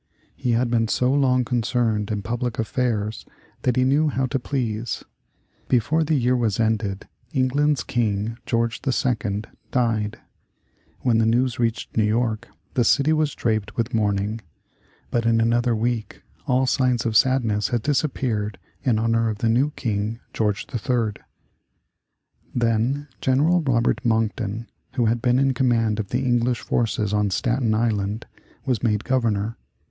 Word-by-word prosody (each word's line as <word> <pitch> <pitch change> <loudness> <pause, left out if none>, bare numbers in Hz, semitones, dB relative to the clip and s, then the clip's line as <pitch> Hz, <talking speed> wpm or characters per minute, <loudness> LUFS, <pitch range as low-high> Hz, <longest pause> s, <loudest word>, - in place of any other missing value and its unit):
He 120 - -1
had 120 +1 +1
been 115 -1 +2
so 125 +3 +1
long 130 -3 +3
concerned 115 -3 0
in 105 -2 -2
public 120 +2 -2
affairs 110 -2 -1 0.4
that 125 -2 +1
he 130 - +3
knew 145 +4 +3
how 130 -2 0
to 135 +1 -1
please. 120 -4 -3 0.6
Before 140 +7 +2
the 155 0 +1
year 125 -2 +2
was 115 -4 0
ended 110 -3 0 0.3
England's 140 +1 +2
King, 110 -1 -1
George 115 +1 0
II., 115 -6 0 0.3
died. 115 -4 0 0.8
When 115 -3 +2
the 110 - +3
news 120 +1 +1
reached 115 -1 -1
New 110 - +3
York, 110 0 0 0.3
the 125 - +2
city 140 +6 +3
was 155 -2 0
draped 110 -2 -1
with 115 +1 -1
mourning. 105 0 0 0.7
But 115 -1 +1
in 115 0 +3
another 120 +1 +2
week 115 0 -2 0.2
all 130 +1 +3
signs 125 -2 +1
of 115 -2 -1
sadness 115 -4 +3
had 120 -3 -1
disappeared 125 -8 -1 0.2
in 120 -5 +2
honor 115 0 +1
of 105 - -3
the 115 +1 0
new 130 +6 +3
King, 110 0 -2
George 105 -2 0
III. 115 -2 -1 1.3
Then 120 +4 +1
General 150 +7 +3
Robert 125 -5 +1
Monckton, 110 -1 0 0.3
who 125 -3 +1
had 115 +1 +1
been 125 0 +3
in 135 0 +3
command 115 -4 +1
of 105 - -2
the 130 +2 -1
English 120 0 +1
forces 110 -3 0
on 105 -1 +2
Staten 115 +3 +1
Island, 110 -1 -1 0.4
was 125 -5 0
made 105 -3 +1
Governor. 115 -3 0
115 Hz, 150 wpm, -23 LUFS, 110-125 Hz, 1.3 s, long